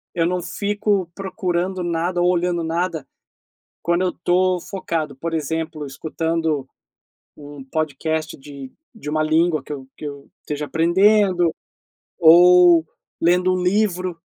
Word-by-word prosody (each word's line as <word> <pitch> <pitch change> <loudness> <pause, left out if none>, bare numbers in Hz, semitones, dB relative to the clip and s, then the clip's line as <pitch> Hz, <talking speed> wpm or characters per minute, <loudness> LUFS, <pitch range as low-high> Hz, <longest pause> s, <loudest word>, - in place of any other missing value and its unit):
eu 165 - +1
não 180 +1 -1
fico 200 0 -1
procurando 185 -2 -2
nada 175 +1 -1
ou 180 - +3
olhando 175 -1 0
nada 165 -2 -2 0.8
quando 170 +1 0
eu 180 - +1
tô 180 +1 +1
focado, 160 -7 -4
por 165 +4 -5
exemplo, 160 0 -3
escutando 160 0 -2 0.7
um 145 -1 -10
podcast 155 +2 -3
de 140 -1 -10 0.2
de 150 -9 -7
uma 155 0 0
língua 160 +1 +1
que - - -10
eu 135 -2 -9
que - - -8
eu 140 -1 -8
esteja 150 0 -4
aprendendo, 180 +2 +3 0.7
ou 175 0 +7 0.3
lendo 180 +2 +3
um 185 - -1
livro, 185 -2 0
170 Hz, 130 wpm, -21 LUFS, 155-180 Hz, 0.8 s, ou